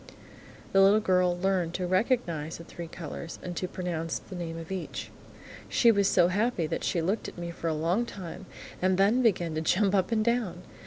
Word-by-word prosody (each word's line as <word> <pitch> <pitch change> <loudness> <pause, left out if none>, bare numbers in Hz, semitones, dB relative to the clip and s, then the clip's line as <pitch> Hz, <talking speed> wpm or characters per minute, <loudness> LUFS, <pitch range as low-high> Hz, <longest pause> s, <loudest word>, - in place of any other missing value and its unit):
The 195 - +5
little 200 +2 +6
girl 180 -3 +2
learned 180 -2 0
to 185 - -1
recognise 180 - 0
the 170 - -10
three 170 0 -8
colours 165 0 -7
and 175 -1 -5
to 185 - -2
pronounce 170 -3 -3
the 190 - -10
name 165 -2 -5
of 165 +2 -8
each. 190 -2 -5 0.6
She 235 - +5
was 200 -2 +3
so 175 - +4
happy 205 -2 +1
that 155 - -3
she 170 - 0
looked 195 +6 -1
at - - -9
me 170 0 -4
for 170 - -5
a 160 - +1
long 175 +10 0
time, 190 -1 -8 0.3
and 185 0 +2
then 205 +6 +4
began 180 -8 +2
to 155 - -1
jump 195 +4 +2
up 190 +1 +2
and 215 -1 +2
down. 225 -7 0
180 Hz, 205 wpm, -28 LUFS, 170-200 Hz, 0.6 s, little